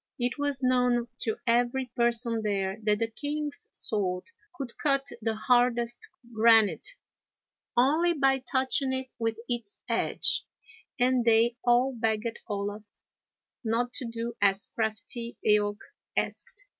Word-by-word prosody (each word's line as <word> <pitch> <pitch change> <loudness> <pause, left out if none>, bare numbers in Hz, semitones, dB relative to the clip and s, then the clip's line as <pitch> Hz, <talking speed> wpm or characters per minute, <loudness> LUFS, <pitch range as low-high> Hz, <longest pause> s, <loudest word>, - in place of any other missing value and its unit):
It 245 +3 -1
was 285 -2 -1
known 250 -1 +2
to 220 - -1
every 245 +1 +1
person 235 -1 +1
there 200 -1 -1
that 210 -1 +4
the 230 +1 0
king's 290 +3 -3
sword 190 - -3 0.2
could 270 -7 -6
cut 275 -2 +2 0.2
the 220 0 -1
hardest 240 +1 +2 0.3
granite, 225 - +4 0.8
only 310 +8 +4
by 270 -3 +2
touching 260 +1 0
it 260 -1 -4
with 225 -1 -1
its 235 -4 -4
edge, - - +1 0.6
and 250 0 +3
they 230 +1 +4
all 245 +2 +3
begged 225 -1 -1
Olaf 205 0 -3 0.8
not 240 +2 0
to 260 - 0
do 230 0 -4
as 195 0 +3
crafty 230 +2 -2
Eaoch 205 0 +3 0.4
asked. - - -2
235 Hz, 125 wpm, -28 LUFS, 220-260 Hz, 0.8 s, that